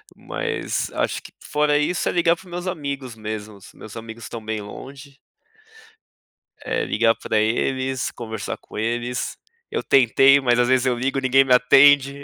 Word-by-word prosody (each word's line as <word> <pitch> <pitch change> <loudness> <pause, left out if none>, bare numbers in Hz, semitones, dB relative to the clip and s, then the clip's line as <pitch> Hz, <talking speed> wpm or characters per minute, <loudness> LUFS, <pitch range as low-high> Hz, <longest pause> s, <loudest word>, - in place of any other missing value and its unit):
Mas - - -3
acho - - -1
que - - -13
fora 150 0 +1
isso 150 +4 0
é - - 0
ligar 170 -1 +3
para 180 - -17
os - - -15
meus 175 +1 -5
amigos 140 -8 -4
mesmos, 110 -2 -8
meus 110 - -12
amigos 115 0 -9
estão 115 -2 -8
bem 110 0 -3
longe. 135 +6 -11 1.5
É, - - -1
ligar 115 +1 +2
para 110 - -2
eles, 130 +4 -1
conversar 110 -3 -6
com - - -13
eles. 120 +3 -2 0.3
Eu - - -1
tentei, 135 +2 +5
mas 120 -2 +2
às 120 - +3
vezes 130 0 +2
eu 125 -2 +1
ligo, 135 +3 -1
ninguém 135 0 +4
me 130 - +3
atende. 140 +2 +5
130 Hz, 165 wpm, -22 LUFS, 115-140 Hz, 1.5 s, tentei